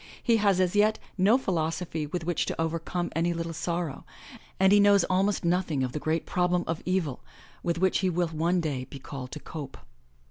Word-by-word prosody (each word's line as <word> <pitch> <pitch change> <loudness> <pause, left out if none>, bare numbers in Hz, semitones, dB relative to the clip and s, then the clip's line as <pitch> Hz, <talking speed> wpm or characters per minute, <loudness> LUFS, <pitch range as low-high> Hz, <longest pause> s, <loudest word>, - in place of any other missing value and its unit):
He 230 -2 +4
has 200 -3 +3
as 185 +1 +1
yet 215 +1 +4 0.2
no 205 +6 +4
philosophy 165 - -2
with 170 +3 -4
which 175 0 -1
to - - -4
overcome 165 +2 -2
any 170 +1 +1
little 165 0 -3
sorrow, 170 -2 -3 0.6
and 190 0 +5
he 205 - +7
knows 200 -2 +6
almost 190 +1 +1
nothing 170 -5 +1
of 125 - -2
the 150 - -4
great 160 +2 -1
prob 180 -1 0
lem 175 0 +2
of 165 0 -3
evil 180 -8 -1 0.4
with 170 -1 -1
which 185 +1 +2
he 190 - +1
will 175 -1 0
one 170 +3 +1
day 140 -6 -2
be 140 - -10
called 130 -1 -8
to 150 - -5
cope. 145 -3 -8
170 Hz, 205 wpm, -28 LUFS, 160-185 Hz, 0.6 s, he